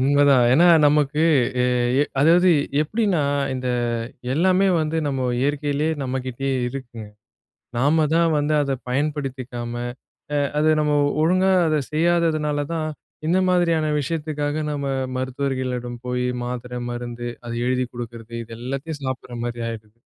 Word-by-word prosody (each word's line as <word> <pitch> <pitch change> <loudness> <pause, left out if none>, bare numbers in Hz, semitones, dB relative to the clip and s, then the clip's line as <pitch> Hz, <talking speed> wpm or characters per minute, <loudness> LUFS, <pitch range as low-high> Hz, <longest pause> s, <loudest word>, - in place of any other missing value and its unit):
உண்மதான், 140 -1 +4
ஏன்னா, 165 +7 +6 0.2
நமக்கு 150 +1 +2 0.4
எ - - +2 0.4
எ - - +1 0.2
அதாவது 175 +4 +5 0.3
எப்படின்னா, 195 -1 0 0.3
இந்த 125 0 -3 0.7
எல்லாமே 185 +4 +3
வந்து 155 +1 -1
நம்ம 130 -2 -1
இயற்கைலயே, 145 +2 0
நம்மகிட்டயே 130 +1 -3 0.2
இருக்குங்க. 120 -4 -8 0.7
நாம 150 +5 +3
தான் 170 0 +4
வந்து 145 +1 +1
அத 140 -1 -1 0.2
பயன்படுத்திக்காம, 130 -4 -3 0.6
அ - - +2 0.2
அத 155 - +2
நம்ம 150 -1 +1 0.3
ஒழுங்கா 185 +3 +3
அத 155 -1 +2
செய்யாததுனால 155 -3 +1
தான், 155 -1 -2 0.4
இந்த 180 +3 +3
மாதிரியான 165 -4 +2
விஷயத்துக்காக 150 0 -2
நம்ம 140 -1 -3 0.3
மருத்துவர்களிடம் 130 -2 -3
போயி, 125 0 -1 0.2
மாத்திரை, 125 0 -5
மருந்து. 120 0 -5 0.2
அது 120 - -4
எழுதிக் 125 -1 -1
குடுக்கிறது, 115 -1 -8
இது 115 0 -10
எல்லாத்தையும் 140 +4 -5
சாப்பிடுற 125 -2 -5
மாரி 120 -1 -4
ஆயிருது! 110 -1 -8
140 Hz, 125 wpm, -22 LUFS, 125-155 Hz, 0.7 s, ஏன்னா